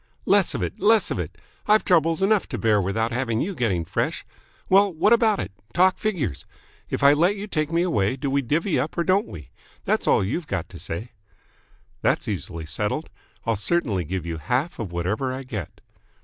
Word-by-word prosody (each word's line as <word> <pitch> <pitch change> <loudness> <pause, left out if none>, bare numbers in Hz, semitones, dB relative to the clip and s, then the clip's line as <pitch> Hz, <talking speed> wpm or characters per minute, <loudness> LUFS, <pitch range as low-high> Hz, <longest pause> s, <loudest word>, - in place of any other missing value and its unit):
"Less - - +3
of - - -2
it, - - -4
less 220 0 +3
of - - -2
it. - - -5 0.3
I've 215 +1 +4
troubles 165 -1 +3
enough 210 0 +2
to 120 - -3
bear 105 -1 +3
without 110 +5 -1
having 115 -2 -1
you 195 +9 -1
getting 100 - 0
fresh. - - -2 0.4
Well, 195 +1 +5
what 195 +7 +3
about 225 -3 +4
it? 95 - -4 0.2
Talk 185 +1 +4
figures. 155 - -2 0.4
If - - -2
I 140 +1 +8
let 175 +7 +3
you 205 0 -5
take 155 -6 -2
me 170 +1 +2
away, 105 - +1
do 140 +2 -4
we 140 +1 +2
divvy 155 - 0
up 155 - -3
or 170 - +2
don't 190 +4 +2
we? 75 -7 -10 0.4
That's - - 0
all - - +4
you've 150 - -3
got 90 -3 -3
to 85 - -10
say." 105 +9 -5 0.9
"That's - - +1
easily 85 -4 -4
settled. 105 - -3 0.3
I'll 115 - +1
certainly 105 - 0
give 90 +2 -4
you 85 -1 -4
half 130 - -1
of 105 -6 -4
whatever 100 +10 -1
I 130 +1 -5
get." 110 - -7
130 Hz, 200 wpm, -24 LUFS, -, 0.9 s, I